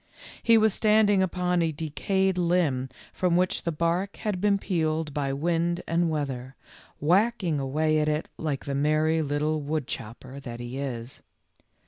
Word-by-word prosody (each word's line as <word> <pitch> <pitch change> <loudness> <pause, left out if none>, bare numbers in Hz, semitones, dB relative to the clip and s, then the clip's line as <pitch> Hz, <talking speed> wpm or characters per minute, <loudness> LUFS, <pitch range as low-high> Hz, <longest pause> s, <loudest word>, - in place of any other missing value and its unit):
He 230 -1 +5
was 220 -2 +4
standing 210 -2 +4
upon 180 -1 +1
a 165 -1 +1
decayed 185 +5 0
limb 170 -7 +1 0.2
from 180 -2 +1
which 180 +1 +1
the 170 - -2
bark 170 +5 -1
had 205 -4 -3
been 205 -1 +3
peeled 160 -5 -1
by 140 -2 -1
wind 170 +4 0
and 165 0 +1
weather, 135 -4 -3 0.4
whacking 180 0 +2
away 155 +3 +1
at 150 0 +1
it 150 +1 -1
like 150 -4 -3
the 140 - -3
merry 155 +3 +2
little 150 +1 0
woodchopper 135 -3 -5
that 120 -4 -7
he 120 +2 -5
is. 125 -3 -5
160 Hz, 150 wpm, -27 LUFS, 140-180 Hz, 0.4 s, He